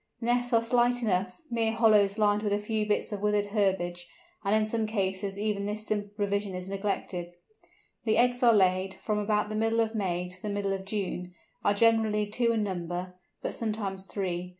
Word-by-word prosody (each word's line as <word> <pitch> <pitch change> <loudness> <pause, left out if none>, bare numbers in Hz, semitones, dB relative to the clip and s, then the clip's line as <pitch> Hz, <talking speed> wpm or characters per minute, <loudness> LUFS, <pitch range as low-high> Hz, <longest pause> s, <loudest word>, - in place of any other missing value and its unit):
The 230 - -5
nests 245 +1 +1
are 230 -1 +4
slight 245 +1 +2
enough, 195 - -1
mere 225 -1 +1
hollows 210 -3 +4
lined 210 -1 +3
with 205 -1 0
a - - +2
few 210 0 -1
bits 210 - 0
of 205 -2 -4
withered 210 0 +2
herbage, 175 -4 0 0.4
and 200 +1 +2
in 215 0 +3
some 220 0 -1
cases 195 -2 -1
even 205 -1 -1
this 215 +1 -4
simple 205 -1 -2
provision 200 -2 -1
is 180 0 -6
neglected. 195 -3 -3 0.7
The 220 -1 +3
eggs, 245 0 +4
which 250 - -5
are - - +7
laid 190 -1 +2
from 210 -1 -2
about 210 0 0
the 215 - -4
middle 225 +1 +1
of 225 -1 +1
May 180 -4 -1
to 180 +1 -10
the 210 - -4
middle 200 -1 -1
of 190 0 -5
June, 185 -3 -4 0.3
are 205 - +3
generally 220 -1 +3
two 230 +3 +1
in 225 -2 +1
number, 180 -1 -4 0.3
but - - -2
sometimes 200 -4 -3
three. 180 -3 -3
205 Hz, 200 wpm, -28 LUFS, 190-220 Hz, 0.7 s, are